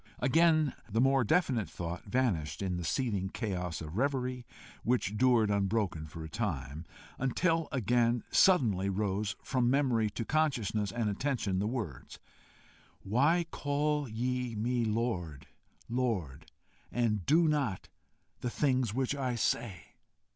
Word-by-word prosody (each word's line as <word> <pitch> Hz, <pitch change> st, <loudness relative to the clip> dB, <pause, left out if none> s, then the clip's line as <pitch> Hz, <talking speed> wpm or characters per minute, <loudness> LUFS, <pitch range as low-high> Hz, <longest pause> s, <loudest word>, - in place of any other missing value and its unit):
Again 155 Hz, +2 st, +3 dB, 0.2 s
the 110 Hz, +2 st, 0 dB
more 135 Hz, +1 st, +4 dB
definite 125 Hz, -, +1 dB
thought 85 Hz, 0 st, -6 dB
vanished 95 Hz, -, -1 dB
in 90 Hz, -2 st, -1 dB
the 90 Hz, -, -4 dB
seething 100 Hz, -2 st, -1 dB
chaos 90 Hz, -7 st, -3 dB
of 80 Hz, +1 st, -7 dB
reverie, 125 Hz, -2 st, -1 dB, 0.3 s
which 115 Hz, -4 st, 0 dB
dured 115 Hz, -3 st, +4 dB
unbroken 100 Hz, -5 st, 0 dB
for 80 Hz, +1 st, -8 dB
a -, -, -6 dB
time, 80 Hz, -, -4 dB, 0.3 s
until 165 Hz, +5 st, +1 dB
again 120 Hz, -1 st, +1 dB
suddenly 110 Hz, -, +4 dB
rose 100 Hz, +1 st, -1 dB
from 125 Hz, -2 st, +1 dB
memory 125 Hz, -5 st, +2 dB
to 115 Hz, +2 st, -5 dB
consciousness 115 Hz, -10 st, 0 dB
and 120 Hz, -2 st, -1 dB
attention 105 Hz, -3 st, -1 dB
the 105 Hz, -, 0 dB
words: 110 Hz, -, -5 dB, 0.9 s
"Why 145 Hz, -, +2 dB
call 145 Hz, -1 st, -1 dB
ye 125 Hz, +1 st, -2 dB
me 120 Hz, +3 st, 0 dB
Lord, 90 Hz, -, -2 dB, 0.4 s
Lord, 90 Hz, -, -2 dB, 0.4 s
and 110 Hz, -5 st, 0 dB
do 165 Hz, +2 st, +5 dB
not 140 Hz, -11 st, 0 dB, 0.5 s
the 125 Hz, -, -2 dB
things 130 Hz, -5 st, +1 dB
which 130 Hz, +1 st, 0 dB
I 130 Hz, -3 st, -2 dB
say?" 105 Hz, -4 st, -1 dB
115 Hz, 130 wpm, -31 LUFS, 95-130 Hz, 0.9 s, do